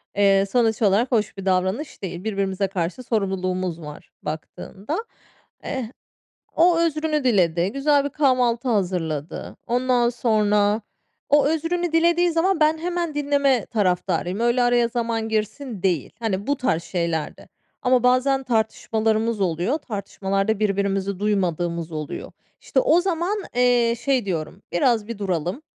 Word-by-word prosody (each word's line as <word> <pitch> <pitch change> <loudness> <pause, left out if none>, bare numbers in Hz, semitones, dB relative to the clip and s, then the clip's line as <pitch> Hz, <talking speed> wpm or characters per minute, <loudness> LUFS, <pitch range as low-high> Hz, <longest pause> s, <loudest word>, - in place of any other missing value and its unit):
eee, 195 -1 +4
sonuç 230 -3 +2
olarak 215 +5 +3
hoş 215 -3 0
bir 195 - -7
davranış 190 +10 -1
değil. 180 -1 -5
Birbirimize 195 -2 -1
karşı 185 +5 -3
sorumluluğumuz 185 -5 -2
var 150 -1 -10
baktığında. 195 - -5 0.6
Eee, 255 -4 -4 0.6
o 335 0 +4
özrünü 310 -2 0
diledi, 180 -6 +2
güzel 285 0 +2
bir - - -1
kahvaltı 255 -4 +1
hazırladı, 175 -8 -2
ondan 245 0 +2
sonra 210 -3 +2 0.5
O 290 -1 +5
özrünü 330 +2 -1
dilediği 340 +1 +3
zaman 335 +2 +1
ben 310 +1 +3
hemen 340 -1 -3
dinleme 280 -4 +2
taraftarıyım, 185 -2 0
öyle, 240 +1 +2
araya 245 -1 +3
zaman 230 -1 -2
girsin 215 0 -3
değil. 175 -7 0
Hani, 205 -2 -2
bu 285 - +2
tarz 170 -11 0
şeylerde 170 -4 -3 0.3
ama 250 -1 +3
bazen 260 +2 +3
tartışmalarımız 220 -1 0
oluyor. 180 - 0
Tartışmalarda 200 -1 -2
birbirimizi 200 -2 0
duymadığımız 175 -5 -1
oluyor. 155 -2 -6 0.3
İşte, - - +1
o 430 -9 +4
zaman, 370 +2 -1 0.2
eee, 245 -1 +3
şey 260 -3 +1
diyorum, 175 +1 -4
"Biraz 220 +3 +2
bir 230 -3 -5
duralım. 185 - -2
220 Hz, 130 wpm, -23 LUFS, 190-265 Hz, 0.6 s, O